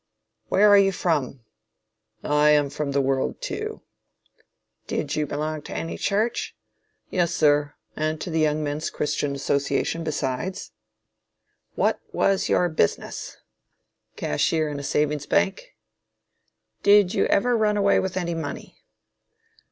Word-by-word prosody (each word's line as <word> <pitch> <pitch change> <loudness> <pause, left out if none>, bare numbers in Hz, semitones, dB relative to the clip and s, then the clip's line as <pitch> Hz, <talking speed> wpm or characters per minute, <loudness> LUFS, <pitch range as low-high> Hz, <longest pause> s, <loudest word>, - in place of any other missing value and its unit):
Where 205 - +4
are 205 0 +8
you 195 0 +4
from? 150 -8 -1 0.8
I 150 0 +3
am 145 -2 +3
from 150 -1 -3
the 140 0 +2
world 135 0 -1
too. - - -5 1.0
Did 150 -1 -2
you 150 -1 -1
belong 150 +2 -3
to - - -8
any 165 - -4
church? 215 +4 -1 0.6
Yes 175 -3 +1
sir, 145 -1 +2 0.2
and 155 0 -2
to 175 - -5
the 160 - 0
Young 155 0 +1
Men's 145 +1 -2
Christian 145 -1 -2
Association 140 +4 -1
besides. 155 +4 -3 1.0
What - - +1
was 195 -1 +1
your 180 - +3
business? 155 - -2 0.8
Cashier 155 - 0
in 145 -1 -5
a - - -7
Savings 150 +1 0
Bank. 200 - 0 1.1
Did 200 -2 +5
you - - +2
ever 240 +5 +2
run 210 -2 +2
away 200 -1 +3
with 190 -1 -3
any 170 -2 -1
money? 160 -4 -6
155 Hz, 130 wpm, -24 LUFS, 145-190 Hz, 1.1 s, are